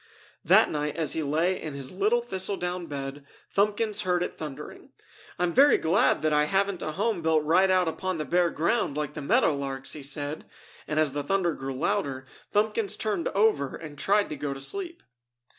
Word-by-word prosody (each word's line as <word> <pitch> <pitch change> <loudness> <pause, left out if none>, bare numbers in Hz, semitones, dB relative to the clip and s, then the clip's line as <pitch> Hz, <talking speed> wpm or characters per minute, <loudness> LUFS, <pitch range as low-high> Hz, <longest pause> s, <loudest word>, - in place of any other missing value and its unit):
That - - +5
night 150 -1 -2
as 160 -3 0
he 160 - -1
lay 160 +6 0
in 155 -3 -6
his 135 -2 -3
little 210 +6 +1
thistle 190 -3 -1
down 180 -1 -4
bed, 140 0 -6 0.3
Thumbkins 210 +1 +1
heard 180 -3 +1
it - - -5
thundering. 150 -4 -8 0.5
"I'm 175 -1 0
very 285 +2 +6
glad 170 +1 +2
that 155 -1 +2
I 150 0 +3
haven't 195 +2 0
a 155 - -3
home 205 0 -1
built 160 -1 +2
right 180 +5 +4
out 185 -2 +3
upon 185 +2 -2
the 155 - -3
bare 175 0 +2
ground 165 -2 0
like 150 -1 -3
the 150 - -6
meadow 210 - +3
larks!" 135 -1 -3
he 150 - -6
said. 145 +2 -3 0.4
And 150 - 0
as 150 -3 +2
the 145 - -2
thunder 175 +2 0
grew 135 -1 -5
louder, 140 -6 -1 0.3
Thumbkins 210 0 +1
turned 205 -6 -1
over 195 -10 +1
and 155 -3 -9
tried 200 +7 +1
to - - -4
go 140 -1 -4
to - - -8
sleep. 345 - -4
165 Hz, 195 wpm, -27 LUFS, 150-200 Hz, 0.5 s, very